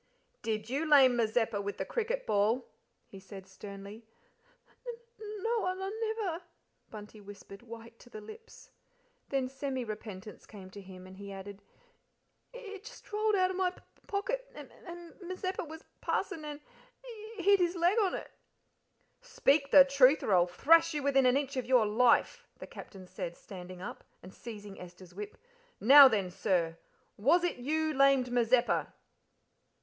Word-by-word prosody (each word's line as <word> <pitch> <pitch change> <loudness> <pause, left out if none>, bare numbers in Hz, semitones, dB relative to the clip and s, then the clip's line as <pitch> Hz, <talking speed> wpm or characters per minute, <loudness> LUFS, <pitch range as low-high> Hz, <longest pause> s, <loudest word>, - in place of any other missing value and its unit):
"Did 215 -2 -3
you 285 +6 -2
lame 265 -4 +7
Mazeppa 225 -2 0
with 200 0 -5
the - - -3
cricket - - -2
ball?" 220 +5 +1 0.4
he 195 - -12
said 190 0 -11
sternly. 200 +3 -10 0.8
"N 480 - -4
n 440 -3 -11
no 460 -1 0
I 370 - 0
n 385 +1 -4 0.2
never," 365 -6 -3 0.5
Bunty 210 0 -11
whispered, 200 0 -12
white 230 0 -12
to - - -17
the 215 - -9
lips. 435 - -13 0.6
Then 270 -2 0
semi 265 -1 -4
repentance 210 -2 -8
came 190 -3 -12
to 200 - -10
him, 185 -1 -12
and 185 0 -13
he 200 0 -9
added: 195 +1 -9 0.9
"It 425 -5 -10
just - - -13
rolled 430 0 +2
out 370 -1 +2
of 375 - -5
my 375 -1 +2
p 360 - -16
p - - -33
pocket, 480 +5 -3
and - - -11 0.2
M 345 -1 -10
Mazeppa 370 +1 -4
was 320 +1 -10 0.2
passing 320 -5 -2
and 295 0 -7 0.4
h - - -23 0.3
h 370 - -6
hit 400 0 +6
his 350 0 +1
l 345 - -6
leg 365 +6 +3
on 395 -4 +1
it." - - -8 0.9
"Speak 310 - +1
the 280 -1 +9
truth, 275 +1 +4
or 205 - +1
I'll 175 -1 +4
thrash 330 - +4
you 295 - -2
within 270 -2 +3
an 250 +2 +4
inch 280 -1 -3
of 250 -2 -3
your 250 -4 +4
life," 230 +3 +2
the - - -9
Captain 190 -2 -11
said, 180 -2 -7
standing 185 -1 -10
up, - - -8 0.2
and 185 +1 -12
seizing 210 -4 -10
Esther's 180 0 -13
whip: 205 +2 -8 0.4
"Now 275 +5 +10
then, 200 -7 -1
sir 170 -3 -1 0.4
was 310 - +3
it 350 - -1
you 310 +5 -1
lamed 275 -2 +3
Mazeppa?" 245 0 +2
255 Hz, 170 wpm, -31 LUFS, -, 0.9 s, Now